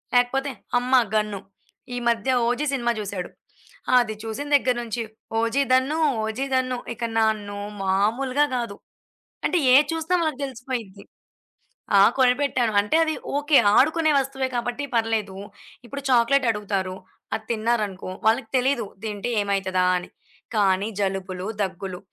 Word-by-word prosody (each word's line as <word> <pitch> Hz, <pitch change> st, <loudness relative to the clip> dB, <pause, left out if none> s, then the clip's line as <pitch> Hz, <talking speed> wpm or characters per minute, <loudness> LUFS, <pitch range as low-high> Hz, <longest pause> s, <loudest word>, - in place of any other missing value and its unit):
లేకపోతే 270 Hz, +3 st, +2 dB, 0.3 s
అమ్మ! 250 Hz, +1 st, -4 dB, 0.2 s
గన్ను. 210 Hz, -2 st, 0 dB, 0.6 s
ఈ -, -, -3 dB
మధ్య 235 Hz, +3 st, +1 dB
'ఓజి' 255 Hz, +5 st, 0 dB
సినిమా 240 Hz, -3 st, +1 dB
జూసాడు. 195 Hz, -3 st, -4 dB, 0.7 s
అది 220 Hz, -3 st, -1 dB
చూసిన 225 Hz, +6 st, -5 dB
దెగ్గర 255 Hz, -3 st, +2 dB
నుంచి. 230 Hz, 0 st, -3 dB, 0.4 s
'ఓజి' 230 Hz, +5 st, +1 dB
దన్ను, 270 Hz, +5 st, +2 dB, 0.2 s
'ఓజి' 220 Hz, +6 st, -2 dB
దన్ను. 255 Hz, -1 st, 0 dB, 0.2 s
ఇక 235 Hz, -, -7 dB
నన్ను 215 Hz, -2 st, 0 dB, 0.3 s
మాములుగా 235 Hz, +9 st, +1 dB
కాదు. 230 Hz, -4 st, -4 dB, 0.7 s
అంటే 355 Hz, -, +2 dB, 0.2 s
ఏది 285 Hz, +3 st, +6 dB
జూసినా 325 Hz, +2 st, 0 dB
వాళ్ళకు 310 Hz, -4 st, -2 dB
తెలిసిపోయిద్ది. 240 Hz, -6 st, -6 dB, 0.9 s
ఆ! -, -, +7 dB, 0.2 s
కొనిపెట్టాను. 250 Hz, -2 st, +2 dB
అంటే 210 Hz, +10 st, +1 dB
అది 315 Hz, -, 0 dB, 0.2 s
ఓకే. 295 Hz, 0 st, +4 dB, 0.2 s
ఆడుకునే 315 Hz, +2 st, +4 dB
వస్తువె 270 Hz, 0 st, -2 dB
కాబట్టి 245 Hz, +4 st, -2 dB
పర్లేదు. 220 Hz, -4 st, 0 dB, 0.5 s
ఇప్పుడు 280 Hz, +3 st, -7 dB
చాక్లేట్ 250 Hz, +2 st, +4 dB
అడుగుతారు. 195 Hz, -3 st, -3 dB, 0.4 s
అది 220 Hz, 0 st, -4 dB
తిన్నారనుకో, 215 Hz, -4 st, -1 dB, 0.2 s
వాళ్ళకి 220 Hz, 0 st, +2 dB
తెలీదు. 255 Hz, -2 st, +1 dB, 0.2 s
తింటే 210 Hz, +2 st, -3 dB
ఏమైతదా 195 Hz, -2 st, 0 dB
అని. 180 Hz, -, -5 dB, 0.5 s
కానీ 200 Hz, 0 st, +2 dB
జలుబులు, 190 Hz, -1 st, -2 dB, 0.2 s
దగ్గులు. 185 Hz, -1 st, -4 dB
235 Hz, 125 wpm, -24 LUFS, 205-265 Hz, 0.9 s, ఆ